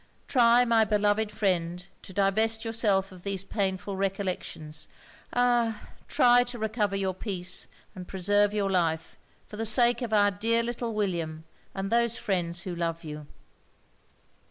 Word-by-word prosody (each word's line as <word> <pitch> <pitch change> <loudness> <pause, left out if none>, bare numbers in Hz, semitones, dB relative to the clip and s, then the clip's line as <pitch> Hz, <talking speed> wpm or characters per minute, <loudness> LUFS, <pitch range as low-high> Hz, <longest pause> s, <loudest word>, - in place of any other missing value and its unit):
Try, 240 -1 +5
my 230 -2 +4
beloved 210 0 +1
friend, 180 -3 -1
to - - -11
divest 220 +4 +1
yourself 210 -4 +1
of 185 -1 -13
these 195 0 -3
painful 195 -1 -2
recollections 190 -5 -3 0.4
ah! 240 -3 +1 0.2
try 245 0 +5
to 245 0 -6
recover 215 -2 -1
your 190 -1 -1
peace, 185 -2 -3 0.3
and 180 -1 -9
preserve 205 +2 +2
your 205 -2 -1
life, 165 -3 -1 0.3
for 210 - -10
the 225 - -2
sake 235 +2 +4
of 235 -3 -3
our 205 -1 +4
dear 230 +3 +1
little 235 -1 -4
William 170 -6 -2 0.3
and 195 0 -3
those 235 0 +2
friends 175 -3 -1
who 180 0 -5
love 170 -1 -3
you.' 150 -1 -8
200 Hz, 145 wpm, -27 LUFS, 185-225 Hz, 0.4 s, Try